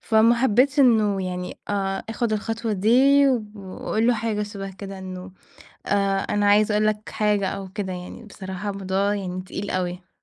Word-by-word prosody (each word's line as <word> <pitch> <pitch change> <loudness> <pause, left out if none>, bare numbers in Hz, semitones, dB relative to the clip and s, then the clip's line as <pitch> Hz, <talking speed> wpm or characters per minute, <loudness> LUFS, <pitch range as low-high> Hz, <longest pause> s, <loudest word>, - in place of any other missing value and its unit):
فما 225 +1 +4
حبيتش 265 +4 +3
إنه 215 -6 +4
يعني 180 0 -5
آآ 195 -1 -1
أخد 225 0 -1
الخطوة 225 +1 -2
دي، 265 +8 +5 0.3
وأقول 205 +3 -3
له 245 - +4
حاجة 215 -1 -1
شبه 200 -1 -6
كده، 195 0 -8
إنه 185 0 -8 0.5
آآ 200 -1 +1
"أنا 205 0 +1
عايزة 210 +1 +4
أقول 215 0 +2
لك 215 0 -1
حاجة" 210 -2 +1
أو 195 0 -5
كده 190 -1 -4
يعني، 180 +4 -8
بصراحة 190 -1 -6
الموضوع 195 +1 -1
يعني 185 -2 -4
تقيل 190 +2 -6
أوي. 180 0 -3
205 Hz, 165 wpm, -23 LUFS, 190-220 Hz, 0.5 s, دي